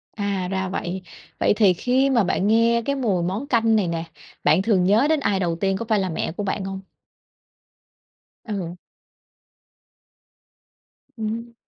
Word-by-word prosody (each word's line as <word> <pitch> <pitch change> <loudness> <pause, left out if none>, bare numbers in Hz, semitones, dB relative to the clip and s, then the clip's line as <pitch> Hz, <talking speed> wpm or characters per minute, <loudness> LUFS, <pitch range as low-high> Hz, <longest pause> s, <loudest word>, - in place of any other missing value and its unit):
À, 200 -3 -2
ra 190 -1 -1
vậy. 185 0 -4 0.4
Vậy - - +3
thì 205 -4 +5
khi 255 +8 +1
mà 235 -5 +3
bạn 185 +2 0
nghe 230 +2 +3
cái 280 - 0
mùi 210 -10 0
món 195 +10 -2
canh 225 -4 +3
này 200 -5 +1
nè, 165 -1 -2 0.4
bạn 160 +5 +4
thường 195 -4 +2
nhớ 210 +8 +4
đến 315 -1 +2
ai 200 -7 0
đầu 170 -2 0
tiên, 195 -1 +1
có 230 - -4
phải 215 -2 +3
là 190 -2 -1
mẹ 160 - -2
của 195 - -4
bạn 195 0 -2
không? 195 0 -5 1.6
Ừ. 190 -6 -4 2.4
Ừm. 225 +1 -4
200 Hz, 160 wpm, -23 LUFS, 185-230 Hz, 2.4 s, thì